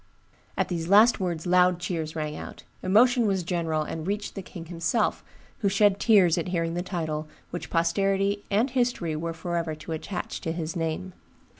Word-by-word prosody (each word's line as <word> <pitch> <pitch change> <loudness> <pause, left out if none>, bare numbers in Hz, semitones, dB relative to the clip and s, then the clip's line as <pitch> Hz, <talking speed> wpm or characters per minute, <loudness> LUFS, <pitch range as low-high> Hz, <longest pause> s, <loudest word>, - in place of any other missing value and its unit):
"At - - 0
these 165 -2 -2
last 215 +6 +6
words 175 -4 -2
loud 180 0 +4
cheers 165 -3 -3
rang 150 -1 -3
out; - - -9 0.2
emotion 235 +5 +4
was 190 -3 0
general, 165 -3 -1
and 160 +2 -5
reached 205 +1 -2
the 195 - -5
king 170 -2 -9
himself, 170 +6 0 0.4
who 200 - +2
shed 200 0 +3
tears 190 -6 +5
at 170 - -3
hearing 165 -2 -1
the 175 - -1
title 160 -4 -3 0.2
which 175 - -5
posterity 195 +4 +1
and 220 +6 +2
history 240 -11 0
were 165 +2 -3
forever 165 -1 -2
to 155 - -9
attach 170 +4 -4
to 165 - -2
his 165 -1 -4
name. 165 +3 -3
175 Hz, 175 wpm, -26 LUFS, 165-200 Hz, 0.4 s, last